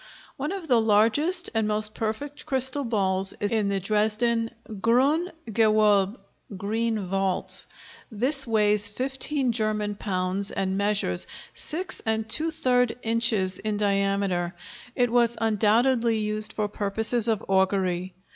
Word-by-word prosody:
One 290 Hz, +4 st, -4 dB
of 385 Hz, -4 st, -6 dB
the 245 Hz, -5 st, +3 dB
largest 230 Hz, -, +3 dB
and 220 Hz, -1 st, 0 dB
most 215 Hz, 0 st, -1 dB
perfect 225 Hz, +7 st, -5 dB
crystal 265 Hz, +1 st, +2 dB
balls 195 Hz, -5 st, 0 dB
is 205 Hz, -, -2 dB
in 215 Hz, -3 st, 0 dB
the 200 Hz, -1 st, -1 dB
Dresden 220 Hz, +3 st, 0 dB, 0.2 s
"Grüne 255 Hz, -, +1 dB, 0.2 s
Gewölbe" 215 Hz, -1 st, +2 dB, 0.4 s
(Green 220 Hz, +1 st, -2 dB
Vaults). 190 Hz, 0 st, 0 dB, 0.4 s
This 265 Hz, +5 st, +2 dB
weighs 210 Hz, -2 st, +3 dB
15 265 Hz, +3 st, 0 dB
German 215 Hz, -2 st, -1 dB
pounds 195 Hz, -1 st, -2 dB
and 190 Hz, 0 st, -2 dB
measures 200 Hz, -, 0 dB, 0.3 s
6⅔ 250 Hz, -, 0 dB
inches 225 Hz, -5 st, +1 dB
in 215 Hz, 0 st, -3 dB
diameter; 195 Hz, -3 st, 0 dB, 0.4 s
it 245 Hz, -2 st, +1 dB
was 235 Hz, -1 st, +2 dB
undoubtedly 225 Hz, +2 st, +2 dB
used 215 Hz, 0 st, -2 dB
for 210 Hz, -1 st, -2 dB
purposes 215 Hz, +3 st, 0 dB
of 220 Hz, -3 st, -1 dB
augury. 190 Hz, -2 st, 0 dB
215 Hz, 120 wpm, -25 LUFS, 200-240 Hz, 0.4 s, the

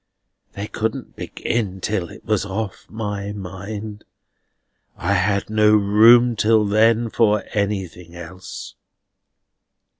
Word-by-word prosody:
They 100 Hz, -, -5 dB
couldn't 110 Hz, +4 st, -4 dB
begin 100 Hz, -5 st, -3 dB
till 95 Hz, -3 st, -2 dB
it -, -, -14 dB
was 105 Hz, -3 st, +1 dB
off 100 Hz, +1 st, -5 dB
my 105 Hz, -2 st, -4 dB
mind. 105 Hz, +2 st, -7 dB, 0.9 s
I 95 Hz, +3 st, 0 dB
had 100 Hz, +1 st, +1 dB
no 110 Hz, 0 st, +4 dB
room 115 Hz, +4 st, +6 dB
till 110 Hz, 0 st, +3 dB
then 115 Hz, +2 st, +3 dB
for 105 Hz, -3 st, +2 dB
anything 95 Hz, -5 st, -3 dB
else." 85 Hz, +2 st, -9 dB
105 Hz, 110 wpm, -21 LUFS, 95-110 Hz, 0.9 s, room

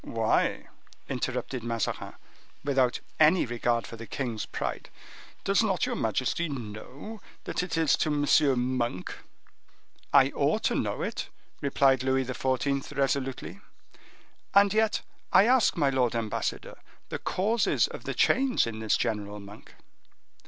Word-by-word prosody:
"Why," 115 Hz, -1 st, 0 dB, 0.4 s
interrupted 130 Hz, -4 st, -3 dB
Mazarin, 115 Hz, -2 st, -3 dB, 0.5 s
without 135 Hz, -3 st, +1 dB, 0.2 s
any 160 Hz, +3 st, +5 dB
regard 120 Hz, 0 st, 0 dB
for 115 Hz, -, -9 dB
the 115 Hz, 0 st, -9 dB
king's 120 Hz, -5 st, -3 dB
pride—"does 195 Hz, +2 st, -3 dB
not 195 Hz, -6 st, +1 dB
your -, -, -2 dB
majesty 130 Hz, -, -1 dB
know 130 Hz, -, -7 dB, 0.2 s
that -, -, -2 dB
it 180 Hz, -2 st, -3 dB
is 160 Hz, -2 st, +4 dB
to 155 Hz, -, 0 dB
M. 140 Hz, -3 st, +2 dB
Monk?" 120 Hz, -7 st, -2 dB, 1.0 s
"I -, -, +6 dB
ought -, -, 0 dB
to -, -, +2 dB
know -, -, -1 dB
it," -, -, -4 dB, 0.3 s
replied 135 Hz, -2 st, +3 dB
Louis 130 Hz, 0 st, +1 dB
XIV., 135 Hz, +2 st, -1 dB
resolutely; 135 Hz, -1 st, -1 dB, 1.0 s
"and 200 Hz, 0 st, +6 dB
yet 220 Hz, 0 st, +2 dB, 0.3 s
I 200 Hz, -, +7 dB
ask 250 Hz, -4 st, +4 dB
my 145 Hz, -4 st, +3 dB
lord 125 Hz, -3 st, +1 dB
ambassador, 110 Hz, -2 st, -3 dB, 0.3 s
the -, -, -4 dB
causes 215 Hz, +5 st, +1 dB
of -, -, -9 dB
the -, -, -3 dB
change 265 Hz, -1 st, +3 dB
in 110 Hz, -1 st, -5 dB
this 110 Hz, -1 st, +1 dB
General 105 Hz, -1 st, -2 dB
Monk?" 100 Hz, +1 st, -13 dB
130 Hz, 130 wpm, -28 LUFS, 115-160 Hz, 1.0 s, I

